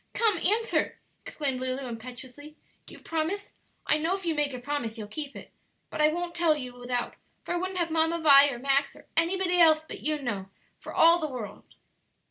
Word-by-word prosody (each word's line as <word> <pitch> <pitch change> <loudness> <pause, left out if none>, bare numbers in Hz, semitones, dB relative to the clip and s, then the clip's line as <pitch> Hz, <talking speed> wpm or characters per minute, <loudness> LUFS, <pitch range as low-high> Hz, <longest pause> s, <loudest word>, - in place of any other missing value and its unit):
"Come, 435 -6 +2
answer," 430 +7 +1 0.3
exclaimed 275 -4 -3
Lulu 260 +1 -2
impetuously; 255 +5 -9 0.3
"do - - -11
you - - -14
promise? 330 +6 -3 0.3
I 305 - +2
know 330 +5 0
if 385 -2 -8
you 330 - +1
make 295 -2 0
a 255 - -5
promise 245 -4 -3
you'll 215 -2 -6
keep 285 +6 -6
it. - - -11 0.4
But - - -2
I 300 - +6
won't 345 +1 -3
tell 340 -3 +3
you 255 -4 -6
without, 245 0 -3 0.3
for - - -3
I - - 0
wouldn't 370 +1 -3
have 340 -2 -1
Mamma 325 +1 +2
Vi, 285 -2 +8
or 260 - -4
Max, 275 +2 +1
or - - -16
anybody 355 +1 +2
else 315 -2 +6
but - - -7
you 305 0 -1
know, 205 -8 -4 0.3
for - - -9
all 335 +1 +5
the 310 -2 -2
world." 245 -6 -8
305 Hz, 205 wpm, -28 LUFS, 255-340 Hz, 0.4 s, Vi